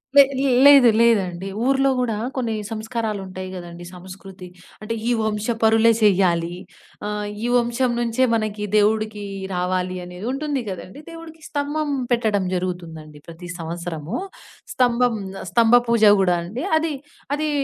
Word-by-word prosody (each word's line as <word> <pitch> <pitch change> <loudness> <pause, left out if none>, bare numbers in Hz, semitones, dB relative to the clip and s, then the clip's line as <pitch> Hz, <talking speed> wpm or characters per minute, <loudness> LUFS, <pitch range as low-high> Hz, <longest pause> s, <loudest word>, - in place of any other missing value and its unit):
లే 280 - +10 0.4
లేదు 280 -4 +8
లేదండి. 195 -5 +2 0.2
ఊరులో 270 +1 +3
గూడా 245 -3 0 0.2
కొన్ని 235 -4 -1 0.2
సంస్కారాలుంటాయి 215 -5 -4
గదండి, 175 -1 -9
సంస్కృతి. 185 +1 -11 0.3
అంటే, 220 +2 -4
ఈ - - +2
వంశపరులే 220 +1 +2
చెయ్యాలి, 175 -4 +2 0.5
ఆహ్, 210 0 -3 0.2
ఈ - - 0
వంశం 240 +1 +1
నుంచే 235 +2 0
మనకి 215 -2 -2
దేవుడికీ 215 0 +1 0.3
రావాలి 180 0 -1
అనేది 180 +3 -9
ఉంటుంది 285 -1 -2
గదండి! 185 +6 -8
దేవుడికి 330 -1 -11
స్తంభం 295 +1 -2 0.2
పెట్టడం 215 -5 +1
జరుగుతుందండి 165 -5 -5
ప్రతి 170 +1 -10
సంవత్సరమూ. 170 +1 -5 0.6
స్తంభం 245 -2 +2 0.2
ఆహ్, - - -8
స్తంభ 230 +4 +5
పూజ 235 -2 +2 0.2
గూడా 180 -2 +3
అండి. 220 - -6
అది 315 -1 -1 0.4
అదీ 305 +1 -2
215 Hz, 125 wpm, -22 LUFS, 180-245 Hz, 0.6 s, లే